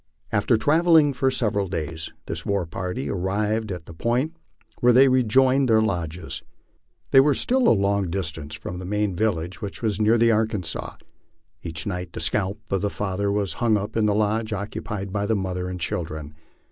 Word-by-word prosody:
After 110 +3 +2
travelling 155 +3 +4
for 130 +1 +1
several 105 -6 0
days 80 -2 -4
this - - -5
war 100 -3 0
party 90 +10 -4
arrived 105 +3 -1
at 90 -3 -6
the - - -10
point 125 - -1 0.4
where 125 0 +5
they 130 +3 +7
rejoined 130 +1 +3
their 110 -1 +5
lodges. 90 -6 -2 0.7
They 135 - +8
were 140 +1 +4
still 255 0 +2
a - - +7
long 100 -3 +2
distance 80 -4 -4
from 90 +3 -6
the 90 - -7
main 105 0 -1
vil 110 +3 +2
lage, 85 +2 -7
which 100 +3 -6
was 110 -2 0
near 110 +2 +4
the 115 0 +4
Arkansas. 110 -5 -1 0.7
Each 80 -1 -4
night 90 -3 -4
the - - -5
scalp 100 0 0
of 95 -2 +1
the 105 - 0
father 100 0 -2
was 100 -4 0
hung 115 -3 +3
up 105 +2 -5
in 110 -1 +2
the 105 - +2
lodge 110 +1 0
occupied 100 -1 -5
by 100 0 -1
the 110 - +2
mother 90 -2 -2
and 90 0 -5
children. 80 -3 -4
100 Hz, 185 wpm, -24 LUFS, 90-115 Hz, 0.7 s, They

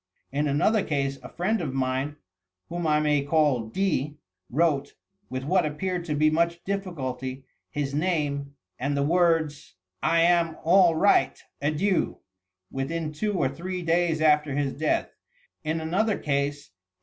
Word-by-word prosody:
In 145 +2 0
another 200 +10 +2
case, 140 -4 -1
a 125 - -9
frieud 210 +5 -1
of 135 -5 -3
mine, 130 +2 -1 0.5
whom 175 0 -3
1 150 -1 +3
may 150 -1 +3
call 140 -5 +2
D., 150 -1 -1 0.3
wrote, 145 -1 +1 0.2
— 195 +1 -45
with 130 0 -4
what 180 +5 +2
appeared 175 +4 -2
to 150 -3 -2
be 155 +1 +3
much 170 +2 0
difficulty, 135 -10 -4 0.2
his 140 -2 -3
name 145 -4 -1 0.2
and 140 +3 -1
the 140 - +2
words: 165 - +1
— 90 0 -54
'I 165 +1 +3
am 170 -1 +3
all 175 0 +5
right. 200 +6 +3 0.2
Adieu,' 160 +6 +1 0.5
within 155 +4 -3
two 210 +6 -1
or 155 - +2
three 180 +6 -5
days 165 -1 +1
after 150 -2 +3
his 140 -2 0
death. 155 +1 0 0.5
In 160 +1 -1
another 195 +7 0
case. 140 -5 -2
155 Hz, 150 wpm, -26 LUFS, 140-170 Hz, 0.5 s, all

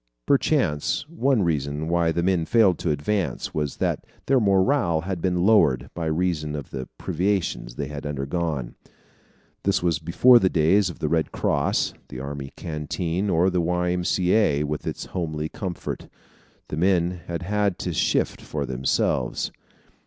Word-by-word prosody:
Perchance 135 - +1
one 135 - +1
reason 75 -2 -1
why 85 -1 +2
the 85 +1 -1
men 90 -3 +2
failed 110 -7 +4
to - - -1
advance 85 +6 -1
was 75 -2 -2
that - - -1 0.2
their 135 -1 +4
morale 95 - +2
had 90 -1 -4
been 90 0 +1
lowered, 70 - +4
by 85 -1 -3
reason 80 -2 -1
of 70 -4 -7
the 65 -2 -5
privations 90 -8 -1
they 70 - -3
had 75 +1 -7
undergone. 70 -2 -2 0.9
This - - +1
was 85 -4 +1
before 120 +10 +6
the 95 - +3
days 90 +4 +3
of 85 - -8
the 75 - -2
Red 80 +1 0
Cross, - - 0
the 65 - -8
army 70 0 -6
canteen, 85 +5 -2
or 90 +2 +3
the 90 -1 +1
Y. 90 +1 0
M. 90 0 -1
C. 90 +1 +1
A. 75 -10 +3
with 75 0 -4
its - - -4
homely 80 -4 -3
comfort. 95 -1 -5 0.6
The 75 - -4
men 90 0 +1
had 85 0 -4
had 100 0 0
to 90 - -1
shift - - 0
for 75 -2 -4
themselves. 65 0 0
85 Hz, 160 wpm, -24 LUFS, 75-95 Hz, 0.9 s, before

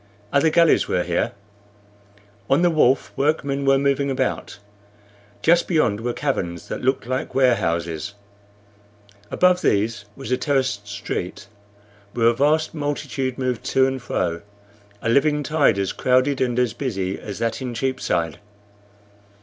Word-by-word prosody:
Other 140 +3 +4
galleys 170 +1 +4
were - - 0
here. - - -1 1.2
On 140 +6 +3
the 175 - +4
wharf 135 -4 +2
workmen 140 -1 0
were 135 0 +5
moving 140 0 +1
about. 135 - -2 0.9
Just 170 +1 +4
beyond 155 - +1
were 120 +1 -1
caverns 90 - -3
that - - -4
looked 130 -1 0
like 130 +2 -3
warehouses. 85 -9 0 1.1
Above 180 0 +3
these 105 +1 0
was 110 - -7
a 125 - +3
terraced 130 -8 -1
street, 100 +1 -5 0.7
where 115 -2 +1
a - - +2
vast 150 +5 +1
multitude 145 -3 -3
moved 130 -3 -2
to 130 - +3
and 130 -1 -2
fro 85 -7 -2 0.6
a - - 0
living 145 +4 +3
tide 145 -7 +2
as 95 -1 -1
crowded 130 +2 +2
and 125 -2 0
as 125 -3 +1
busy 95 -8 -3
as 100 -2 -7
that 115 +2 -2
in 125 -2 -4
Cheapside. 115 - -1
130 Hz, 140 wpm, -22 LUFS, 115-140 Hz, 1.2 s, were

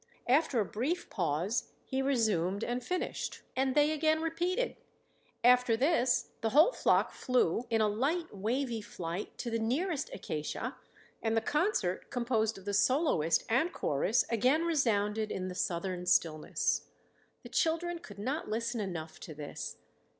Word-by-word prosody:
After 260 -1 +3
a 210 - +2
brief 275 - -2
pause, 175 +4 -1 0.2
he 265 0 -1
resumed 215 -7 +1
and 245 +1 -2
finished, 365 +7 -3
and 265 0 +1
they 295 +1 +5
again 315 0 +2
repeated; 350 +9 -1 0.7
after 245 -1 +5
this 255 -2 +2
the 225 - +1
whole 305 - +6
flock - - +2
flew 245 -3 +1
in 225 -1 +2
a 215 - +4
light 280 +9 -1
wavy 230 +3 -1
flight 175 -1 -6
to 240 - -4
the 230 - 0
nearest 285 +8 -1
acacia 155 -5 -4 0.5
and 225 0 +1
the - - +6
concert, 290 - 0
composed 235 -4 0
of 195 - -13
the 205 - -2
soloist 205 - +3
and 270 +10 +2
chorus, 170 - +1
again 255 +8 +3
resounded 220 -9 +1
in 185 0 -3
the - - -5
southern 180 0 -2
stillness. 155 -3 +1 0.6
The - - -10
children 335 +1 0
could 205 - -12
not 265 +9 -3
listen 230 +2 -1
enough 165 -5 -5
to 155 - -9
this. 145 -1 -6
235 Hz, 150 wpm, -32 LUFS, 200-290 Hz, 0.7 s, whole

